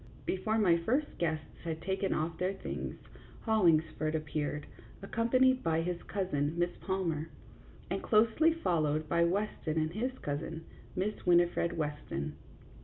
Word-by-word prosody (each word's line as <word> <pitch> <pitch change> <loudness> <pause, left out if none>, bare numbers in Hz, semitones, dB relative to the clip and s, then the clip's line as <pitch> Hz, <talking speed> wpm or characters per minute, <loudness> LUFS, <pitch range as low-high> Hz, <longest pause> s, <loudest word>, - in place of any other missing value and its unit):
Before 215 +4 0
my 180 -6 +5
first 255 - -1
guests 160 -2 -2
had 160 -2 -3
taken 190 +3 -1
off 160 +1 -1
their 185 +2 +1
things - - -5 0.5
Hollingsford 160 -7 +2
appeared, 150 -1 -2 0.4
accompanied 255 +5 +3
by 165 0 +1
his 175 0 -2
cousin, 165 -5 -1
Miss 175 0 +2
Palmer, 170 -5 -2 0.6
and - - -2
closely 230 +9 +4
followed 155 - 0
by 170 +1 +3
Weston 175 -3 -1
and 155 +1 0
his 255 +6 -2
cousin, 160 +3 -4 0.3
Miss 200 +3 -2
Winifred 175 -1 +4
Weston. 150 - -3
170 Hz, 130 wpm, -32 LUFS, 155-205 Hz, 0.6 s, my